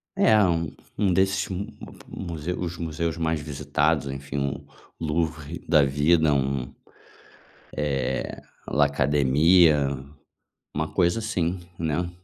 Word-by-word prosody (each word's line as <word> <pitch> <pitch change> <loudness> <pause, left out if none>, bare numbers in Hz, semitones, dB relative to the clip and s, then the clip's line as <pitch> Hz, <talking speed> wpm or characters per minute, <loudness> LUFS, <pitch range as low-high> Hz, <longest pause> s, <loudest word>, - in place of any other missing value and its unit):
É, 110 -1 +5
um 85 -3 0 0.3
um 100 -3 +3
desses 95 +1 +2 0.6
mus 85 -4 -7
os 90 -1 -3
museus 85 0 -2
mais 80 -1 0
visitados, 75 +1 0
enfim, 70 0 -4 0.4
Louvre 80 0 -2
da 75 -3 +6
vida, 75 +3 +3
um, 65 -1 -1 1.0
eh, 70 -3 -2 0.3
La 75 0 +4
academia, 75 +2 +4 0.9
uma 80 +1 -2
coisa 90 +3 +2
assim, 95 -5 -1 0.2
né. 85 +2 -1
80 Hz, 105 wpm, -25 LUFS, 70-85 Hz, 1.0 s, da